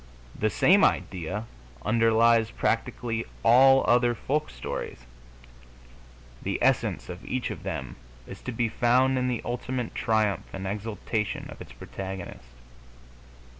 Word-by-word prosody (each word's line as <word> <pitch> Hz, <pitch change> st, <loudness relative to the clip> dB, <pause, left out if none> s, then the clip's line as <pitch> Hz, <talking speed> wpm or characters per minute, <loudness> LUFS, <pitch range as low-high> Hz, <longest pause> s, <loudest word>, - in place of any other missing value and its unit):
The 110 Hz, -, +1 dB
same 190 Hz, -, +4 dB
idea 95 Hz, +4 st, 0 dB, 0.4 s
underlies 115 Hz, 0 st, +4 dB
practically 115 Hz, -1 st, -1 dB, 0.2 s
all 135 Hz, +3 st, +7 dB
other 120 Hz, 0 st, +4 dB
folk 145 Hz, +6 st, -1 dB
stories: -, -, -6 dB, 1.4 s
the -, -, -2 dB
essence -, -, +1 dB
of 90 Hz, 0 st, -8 dB
each 130 Hz, -2 st, -2 dB
of -, -, -7 dB
them 65 Hz, -2 st, -5 dB, 0.3 s
is -, -, -10 dB
to 130 Hz, -, -5 dB
be 120 Hz, 0 st, 0 dB
found 125 Hz, +3 st, +3 dB
in 125 Hz, -, 0 dB
the 125 Hz, -2 st, -2 dB
ultimate 125 Hz, 0 st, -3 dB
triumph 110 Hz, -5 st, 0 dB
and 95 Hz, 0 st, -5 dB
exaltation 105 Hz, +1 st, -3 dB
of -, -, -11 dB
its -, -, -10 dB
protagonist. 90 Hz, -4 st, -8 dB
115 Hz, 125 wpm, -27 LUFS, 100-125 Hz, 1.4 s, all